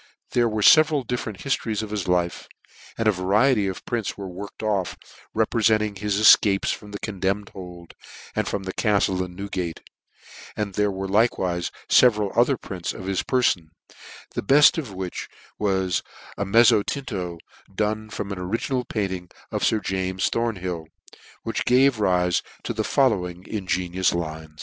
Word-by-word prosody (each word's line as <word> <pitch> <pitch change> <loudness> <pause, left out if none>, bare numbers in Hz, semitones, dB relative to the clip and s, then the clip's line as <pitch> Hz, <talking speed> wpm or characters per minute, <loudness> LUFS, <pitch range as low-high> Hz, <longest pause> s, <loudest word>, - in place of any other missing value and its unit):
There 120 -1 +2
were 105 -1 -1
fcveral 155 -2 +6
different 110 -4 -4
hiftcries 115 -6 -1
of 105 - -7
his 105 -4 -3
life; 90 -1 0 0.5
and 115 - 0
a - - +6
variety 105 +4 +2
of 95 - -5
prints 115 -4 -3
were 100 -1 -6
worked 100 +4 -8
off, 100 -4 -1 0.4
reprefenting 110 -2 +2
his 105 0 0
efcapcs 100 -2 +5
from 105 - -10
the 100 - -6
condemned 100 -1 -2
hold, 90 -2 -10 0.4
and - - 0
from 100 - -2
the 95 0 -5
caftie 100 -4 +1
in 90 -1 -9
Newgate; 90 -3 -4 0.8
and 105 -2 -2
there 105 +2 +1
were 95 0 -4
likewife 95 -4 +1 0.2
feveral 105 -5 +4
other 120 +3 +3
prints 90 -4 -5
of 95 - -8
his 95 -1 0
perfon; 120 -10 +1 0.7
the - - -2
belt 145 +8 +6
of 135 -9 -6
which 95 -2 -5 0.3
was 95 -3 +1 0.3
a 100 - -2
mezzotinto, 105 - +2 0.3
done 110 +2 -2
from 105 -2 -5
an 100 - -4
original 115 +7 -2
painting 95 -6 -3 0.2
of - - -2
Sir 110 - +3
James 95 -1 -1
Thornhill, 95 -8 -2 0.6
which - - -2
gave 130 -1 +4
rife 90 -3 +2 0.2
to - - -3
the 110 -1 -1
fol 135 +2 +3
lowing 90 -3 -4
ingenious 95 -3 -1
lines. 80 -2 -5
100 Hz, 155 wpm, -24 LUFS, 95-110 Hz, 0.8 s, fcveral